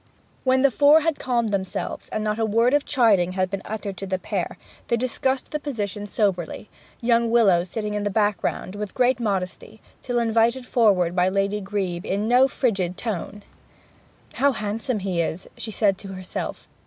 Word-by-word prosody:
When 260 Hz, 0 st, +3 dB
the 275 Hz, -, +5 dB
four 290 Hz, +5 st, +6 dB
had 320 Hz, -1 st, 0 dB
calmed 240 Hz, -3 st, 0 dB
themselves, 190 Hz, -2 st, -3 dB
and 215 Hz, -, -2 dB
not 210 Hz, +1 st, -1 dB
a -, -, +1 dB
word 230 Hz, +4 st, +3 dB
of 290 Hz, -1 st, +3 dB
chiding 205 Hz, -9 st, +3 dB
had 185 Hz, 0 st, -1 dB
been 195 Hz, -1 st, -3 dB
uttered 205 Hz, -3 st, -5 dB
to 195 Hz, -, -5 dB
the 190 Hz, 0 st, 0 dB
pair, -, -, -3 dB, 0.3 s
they 235 Hz, -, +1 dB
discussed 255 Hz, +2 st, -1 dB
the 300 Hz, -, -2 dB
position 205 Hz, -8 st, -4 dB
soberly, 195 Hz, -2 st, -1 dB, 0.3 s
young 235 Hz, -1 st, +3 dB
Willowes 195 Hz, -7 st, +4 dB
sitting 210 Hz, +1 st, -3 dB
in 210 Hz, -, -1 dB
the 205 Hz, -, 0 dB
background 205 Hz, -2 st, -1 dB
with 205 Hz, -1 st, -5 dB
great 250 Hz, 0 st, +3 dB
modesty 200 Hz, -1 st, -3 dB, 0.2 s
till 245 Hz, -2 st, -2 dB
invited 235 Hz, +2 st, +2 dB
forward 195 Hz, -9 st, +3 dB
by 180 Hz, 0 st, +3 dB
Lady 200 Hz, +2 st, 0 dB
Grebe 190 Hz, -3 st, -3 dB
in 205 Hz, +3 st, -1 dB
no 250 Hz, +3 st, +5 dB
frigid 195 Hz, -10 st, -1 dB
tone. 205 Hz, -2 st, -4 dB, 0.9 s
'How 280 Hz, 0 st, +2 dB
handsome 215 Hz, +1 st, -2 dB
he 185 Hz, -3 st, 0 dB
is!' 165 Hz, +2 st, -3 dB
she 225 Hz, -, -6 dB
said 200 Hz, -3 st, +1 dB
to 195 Hz, -1 st, -7 dB
herself. 185 Hz, -1 st, -6 dB
210 Hz, 180 wpm, -24 LUFS, 195-240 Hz, 0.9 s, four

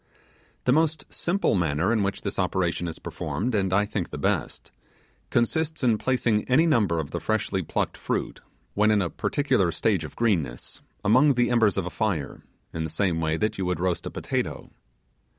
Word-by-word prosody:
The 125 Hz, -, +3 dB
most 160 Hz, +1 st, +1 dB
simple 195 Hz, +4 st, +1 dB
manner 85 Hz, +2 st, +1 dB
in 110 Hz, -, +2 dB
which 100 Hz, 0 st, -2 dB
this 100 Hz, -, -3 dB
operation 90 Hz, -2 st, 0 dB
is 80 Hz, -, -5 dB
performed, 120 Hz, +5 st, -3 dB
and 95 Hz, -3 st, +1 dB
I 100 Hz, +2 st, +3 dB
think, 100 Hz, -4 st, -3 dB
the 75 Hz, -, -6 dB
best, 70 Hz, -, -2 dB, 0.6 s
consists 155 Hz, +6 st, 0 dB
in 115 Hz, -4 st, +3 dB
placing 120 Hz, -5 st, +1 dB
any 150 Hz, +6 st, +5 dB
number 105 Hz, -, +2 dB
of 75 Hz, -3 st, -4 dB
the 85 Hz, -, -2 dB
freshly 100 Hz, +2 st, -1 dB
plucked 80 Hz, -, -2 dB
fruit, -, -, -3 dB, 0.3 s
when 105 Hz, +1 st, +3 dB
in 105 Hz, -1 st, +4 dB
a 85 Hz, -, -3 dB
particular 105 Hz, -, +1 dB
state 95 Hz, +1 st, 0 dB
of 80 Hz, -, -8 dB
greenness, 85 Hz, -, -1 dB, 0.2 s
among 130 Hz, +7 st, +5 dB
the 120 Hz, -1 st, +1 dB
embers 110 Hz, -5 st, +3 dB
of 95 Hz, -, 0 dB
a 90 Hz, -, -5 dB
fire, 95 Hz, -, -2 dB, 0.3 s
in 80 Hz, -, -2 dB
the 80 Hz, -, -3 dB
same 85 Hz, 0 st, 0 dB
way 80 Hz, 0 st, 0 dB
that 110 Hz, +1 st, -1 dB
you 95 Hz, -, 0 dB
would 90 Hz, -2 st, -1 dB
roast 90 Hz, -1 st, -1 dB
a -, -, -3 dB
potato. -, -, -3 dB
100 Hz, 185 wpm, -26 LUFS, 85-120 Hz, 0.6 s, any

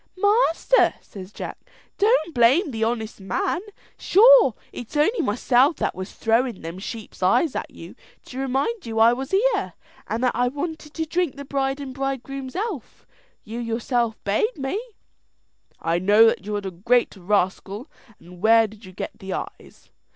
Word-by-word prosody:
"Master," 410 Hz, +2 st, +3 dB
says 190 Hz, -1 st, -11 dB
Jack, -, -, -7 dB, 0.4 s
"don't 400 Hz, -7 st, +2 dB
blame 265 Hz, -, +4 dB
the 225 Hz, -2 st, -2 dB
honest 225 Hz, -1 st, -2 dB
man. 350 Hz, -, -1 dB, 0.4 s
Sure 450 Hz, -, +6 dB, 0.2 s
it's 245 Hz, +5 st, -7 dB
only 415 Hz, +11 st, +2 dB
myself 250 Hz, +7 st, +2 dB
that -, -, -2 dB
was 185 Hz, +1 st, -7 dB
thrown' 230 Hz, -1 st, 0 dB
them 165 Hz, +3 st, -6 dB
sheep's 215 Hz, +1 st, -8 dB
eyes 225 Hz, -, +2 dB
at -, -, -3 dB
you, -, -, -12 dB, 0.3 s
to 260 Hz, -, -8 dB
remind 270 Hz, -, -1 dB
you 225 Hz, -1 st, -4 dB
I 225 Hz, +2 st, +6 dB
was 265 Hz, +2 st, -5 dB
here, 450 Hz, +6 st, +1 dB, 0.3 s
and 230 Hz, +3 st, -2 dB
that 250 Hz, -, +3 dB
I 245 Hz, +1 st, +1 dB
wanted 300 Hz, +2 st, -5 dB
to 320 Hz, -, -2 dB
drink 340 Hz, -1 st, -1 dB
the 280 Hz, 0 st, -8 dB
bride 270 Hz, 0 st, -1 dB
and 270 Hz, -2 st, -6 dB
bridegroom's 270 Hz, 0 st, -4 dB
health. 390 Hz, -, -5 dB, 0.4 s
You 225 Hz, +2 st, -7 dB
know 240 Hz, -, -4 dB
yourself 235 Hz, -1 st, -1 dB
bade 265 Hz, -, 0 dB
me." 275 Hz, +10 st, -2 dB, 1.0 s
"I 165 Hz, +1 st, 0 dB
know 205 Hz, +5 st, +6 dB
that 210 Hz, -3 st, +1 dB
you 210 Hz, -, -2 dB
are 205 Hz, -1 st, -4 dB
a 190 Hz, -, -3 dB
great 230 Hz, +8 st, +1 dB
rascal; 195 Hz, -, -1 dB, 0.3 s
and 175 Hz, +1 st, -15 dB
where 225 Hz, +1 st, +6 dB
did 215 Hz, +1 st, -12 dB
you 185 Hz, -, -12 dB
get 185 Hz, -, -7 dB
the 190 Hz, -2 st, -5 dB
eyes?" -, -, -8 dB
245 Hz, 170 wpm, -23 LUFS, 215-305 Hz, 1.0 s, Sure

